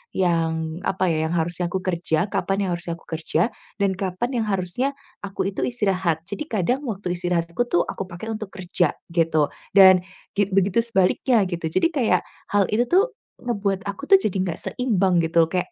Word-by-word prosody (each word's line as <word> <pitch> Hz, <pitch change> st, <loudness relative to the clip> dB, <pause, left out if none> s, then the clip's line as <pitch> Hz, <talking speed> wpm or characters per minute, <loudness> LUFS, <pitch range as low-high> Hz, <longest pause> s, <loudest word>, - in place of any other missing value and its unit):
yang, 165 Hz, -2 st, 0 dB
apa 185 Hz, -2 st, +1 dB
ya, 160 Hz, 0 st, 0 dB
yang 170 Hz, -, -2 dB
harusnya 175 Hz, +1 st, 0 dB
aku 185 Hz, +1 st, -3 dB
kerja 175 Hz, 0 st, 0 dB
kapan 195 Hz, 0 st, 0 dB
yang -, -, -1 dB
harusnya 170 Hz, -1 st, -4 dB
aku -, -, -20 dB
kerja 165 Hz, +6 st, 0 dB, 0.3 s
dan 200 Hz, -2 st, +2 dB
kapan 190 Hz, +5 st, -2 dB
yang 220 Hz, -, -1 dB
harusnya 205 Hz, +8 st, -1 dB, 0.3 s
aku 200 Hz, -1 st, -3 dB
itu -, -, -4 dB
istirahat. 190 Hz, -9 st, 0 dB
Jadi 300 Hz, -, -6 dB
kadang 230 Hz, +6 st, 0 dB
waktu 195 Hz, -5 st, -3 dB
istirahat 175 Hz, -1 st, -1 dB
aku 245 Hz, +8 st, 0 dB
tuh 175 Hz, -5 st, +2 dB
aku 195 Hz, -, -5 dB
pakai 185 Hz, +5 st, -6 dB
untuk 215 Hz, -1 st, -4 dB
kerja 180 Hz, -4 st, -1 dB, 0.2 s
gitu, 160 Hz, -3 st, +2 dB, 0.2 s
dan 190 Hz, -2 st, +9 dB, 0.4 s
gi 205 Hz, -, +3 dB
begitu 195 Hz, +2 st, +2 dB
sebaliknya 230 Hz, +1 st, +3 dB
gitu. 170 Hz, -2 st, -2 dB
Jadi 335 Hz, -, +1 dB
kayak 255 Hz, -7 st, +2 dB, 0.2 s
hal 205 Hz, -1 st, +3 dB
itu 235 Hz, +3 st, +2 dB
tuh 395 Hz, +7 st, +4 dB, 0.3 s
ngebuat 200 Hz, -5 st, -1 dB
aku 200 Hz, +8 st, -6 dB
tuh 390 Hz, -, +10 dB
jadi 200 Hz, -, -1 dB
enggak 175 Hz, -3 st, -3 dB
seimbang 195 Hz, -8 st, +1 dB
gitu. 165 Hz, 0 st, +3 dB
Kayak 180 Hz, -1 st, -1 dB
185 Hz, 185 wpm, -23 LUFS, 170-210 Hz, 0.4 s, tuh